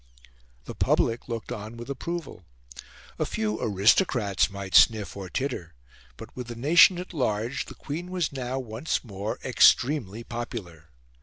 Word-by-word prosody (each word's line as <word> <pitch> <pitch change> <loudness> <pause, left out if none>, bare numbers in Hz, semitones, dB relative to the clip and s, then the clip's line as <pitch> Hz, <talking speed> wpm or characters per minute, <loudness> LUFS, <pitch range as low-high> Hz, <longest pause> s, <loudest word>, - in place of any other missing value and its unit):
The - - -7
public 115 +1 +1
looked 115 -2 -5
on 110 +3 -6
with 120 +1 -8
approval. 140 - -5 0.8
A - - +1
few 110 0 -2
aristocrats 105 - +2
might 100 -1 -7
sniff 105 -6 +5
or 95 -2 -7
titter; 105 - -4 0.4
but 110 - -11
with 125 -1 -6
the 120 - -6
nation 170 - +6
at 180 +1 -7
large 120 -3 -1
the - - -11
Queen 170 +5 -6
was 180 -4 -1
now 130 -1 -4
once 125 +3 -3
more 100 -2 -5
extremely 120 -5 +3
popular. 100 -10 -7
115 Hz, 145 wpm, -26 LUFS, 105-140 Hz, 0.8 s, nation